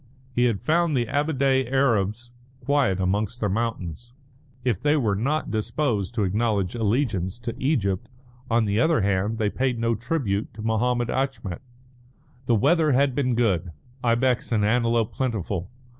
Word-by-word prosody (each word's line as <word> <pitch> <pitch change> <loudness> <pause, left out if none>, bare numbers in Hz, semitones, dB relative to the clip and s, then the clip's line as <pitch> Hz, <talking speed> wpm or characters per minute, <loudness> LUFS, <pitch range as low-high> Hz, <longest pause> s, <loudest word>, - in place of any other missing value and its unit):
He 120 0 +2
had 115 -5 +1
found 165 -2 +2
the 120 - +1
Ababdeh 135 -2 +1
Arabs 120 -3 +1 0.3
quiet 140 -11 +1
amongst 105 +5 -1
their 105 - 0
mountains. 115 0 -3 0.5
If 120 -7 0
they 150 +1 +3
were 110 -8 +1
not 140 +9 -1
disposed 110 -1 -1
to 110 - +1
acknowledge 100 -1 0
allegiance 110 -4 0
to 120 -1 -5
Egypt, 105 - 0 0.4
on 115 -1 +3
the 105 +1 0
other 160 0 +3
hand 100 +3 0
they 105 -2 0
paid 130 -2 0
no 115 0 +1
tribute 115 -4 -2
to 110 - -7
Mahommed 120 +2 0
Achmet. 130 -9 -2 0.9
The 120 - +4
weather 155 - +3
had 135 +1 +3
been 125 -3 0
good, 95 -8 0 0.3
ibex 125 +1 +1
and 105 -3 +2
antelope 115 0 +1
plentiful. 105 -7 -2
115 Hz, 150 wpm, -24 LUFS, 105-130 Hz, 0.9 s, The